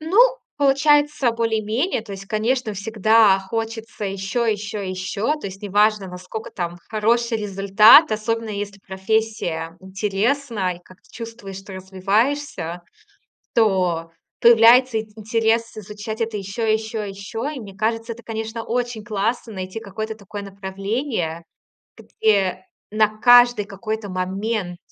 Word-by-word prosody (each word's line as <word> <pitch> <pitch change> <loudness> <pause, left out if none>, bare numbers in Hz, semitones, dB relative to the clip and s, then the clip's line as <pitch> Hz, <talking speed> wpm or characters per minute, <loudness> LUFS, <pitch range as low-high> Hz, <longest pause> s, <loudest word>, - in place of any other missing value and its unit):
Ну, 325 +7 0 0.4
получается 290 -1 +3
более-менее. 225 - -1
То 210 -3 -9
есть, 195 0 -8
конечно, 220 +1 -1
всегда 215 0 +4
хочется 225 +2 -5
ещё, 195 +4 -2
ещё, 210 0 -2
ещё. 190 +7 -2
То 285 - -7
есть 195 +2 -12
неважно, 205 0 +2
наскока 185 +5 -7
там 175 -1 -4
хороший 230 +2 +1
результат, 210 - +6
особенно 225 +1 -2
если 200 -1 -5
профессия 190 -5 -2
интересна, 200 +2 -1
и - - -17
как-то 185 +1 -20
чувствуешь, 225 -4 -8
что 195 0 -11
развиваешься, 190 - -1 0.7
то 180 -7 +1 0.3
появляется 235 +1 +6
ин 220 - -6
интерес 225 +1 0
изучать 215 +2 -6
это 225 -2 -1
ещё, 195 +4 -4
и 215 - +4
ещё, 220 0 -2
и 205 - -5
ещё. 210 +7 -5
И 295 -4 -6
мне 200 -4 -10
кажется, 225 +3 -1
это, 235 0 -15
конечно, 225 0 -5
очень 240 -2 -2
классно 220 +2 -2
найти 185 +2 -5
какое-то 220 +1 -5
такое 205 -1 -8
направление, 195 - -3 0.5
где 195 -4 0 0.3
на 215 0 +4
каждый 245 -2 +6
какой-то 215 +2 -5
момент, 185 +1 -2
215 Hz, 130 wpm, -22 LUFS, 195-230 Hz, 0.7 s, результат